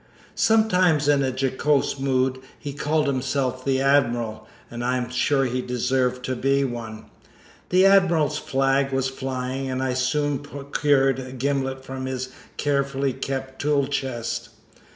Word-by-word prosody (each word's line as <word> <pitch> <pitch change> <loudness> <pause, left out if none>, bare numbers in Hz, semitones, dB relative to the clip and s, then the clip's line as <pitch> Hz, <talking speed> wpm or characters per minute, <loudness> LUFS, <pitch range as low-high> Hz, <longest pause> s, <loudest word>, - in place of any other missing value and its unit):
Sometimes 185 -9 +3
in 145 -1 +4
a 135 - +1
jocose 135 +2 0
mood 130 -1 +1 0.2
he 145 -2 -6
called 150 +2 0
himself 130 -1 -1
the 135 -1 +1
Admiral, 120 -5 +1 0.2
and 120 0 -5
I 125 +1 +1
am 125 -1 -4
sure 135 +2 +2
he 125 0 -1
deserved 125 0 0
to 130 - -2
be 135 +2 +2
one. 115 -4 -5 0.6
The 185 +1 +5
Admiral's 170 -7 +4
flag 135 0 +1
was 135 0 0
flying, 130 0 -4
and 130 0 -2
I 130 -1 0
soon 140 +2 0
procured 140 -1 +1
a 130 -1 -7
gimlet 135 0 -2
from 130 0 -5
his 130 0 -3 0.3
carefully 140 -2 0
kept 130 0 -5
tool 145 -1 +2
chest. 130 -4 -3
135 Hz, 145 wpm, -24 LUFS, 130-140 Hz, 0.6 s, The